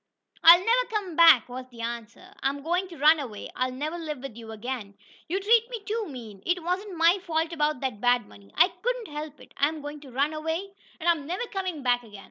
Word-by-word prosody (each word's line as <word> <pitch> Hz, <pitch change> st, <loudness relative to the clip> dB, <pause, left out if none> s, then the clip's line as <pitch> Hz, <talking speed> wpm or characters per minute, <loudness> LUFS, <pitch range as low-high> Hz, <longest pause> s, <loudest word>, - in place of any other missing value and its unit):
"I'll 335 Hz, +1 st, +11 dB
never -, -, +3 dB
come 405 Hz, -6 st, -3 dB
back!" 330 Hz, -7 st, +7 dB
was 255 Hz, +1 st, -8 dB
the 235 Hz, -2 st, -11 dB
answer. 235 Hz, -, -7 dB
"I 270 Hz, -, +2 dB
I'm 280 Hz, 0 st, -6 dB
going 355 Hz, +4 st, 0 dB
to 345 Hz, -3 st, -12 dB
run 305 Hz, +3 st, +6 dB
away! 230 Hz, -8 st, -7 dB
I'll 255 Hz, 0 st, 0 dB
never 305 Hz, +6 st, -4 dB
live 305 Hz, -3 st, -4 dB
with 260 Hz, -3 st, -8 dB
you 225 Hz, -1 st, -9 dB
again! 220 Hz, -2 st, -6 dB, 0.3 s
You 375 Hz, +4 st, 0 dB
treat 455 Hz, +3 st, +3 dB
me 475 Hz, -2 st, -5 dB
too 440 Hz, -1 st, -2 dB
mean! 225 Hz, -7 st, -9 dB
It 355 Hz, -1 st, 0 dB
wasn't 365 Hz, +2 st, -3 dB
my 335 Hz, +4 st, +4 dB
fault 325 Hz, -1 st, -1 dB
about 300 Hz, -4 st, 0 dB
that 255 Hz, -6 st, -3 dB
bad 245 Hz, 0 st, +3 dB
money! 100 Hz, -1 st, -17 dB
I 365 Hz, -, +6 dB
couldn't -, -, -2 dB
help 300 Hz, 0 st, -6 dB
it. -, -, -16 dB
I'm 305 Hz, +2 st, +1 dB
going 295 Hz, +1 st, -7 dB
to 280 Hz, -3 st, -13 dB
run 280 Hz, +5 st, 0 dB
away, 320 Hz, +5 st, -3 dB, 0.3 s
and 335 Hz, -, -4 dB
I'm 320 Hz, -5 st, +2 dB
never 365 Hz, +8 st, -2 dB
coming 370 Hz, -7 st, -3 dB
back 245 Hz, -1 st, +2 dB
again. 210 Hz, -4 st, -13 dB
305 Hz, 230 wpm, -27 LUFS, 255-360 Hz, 0.3 s, I'll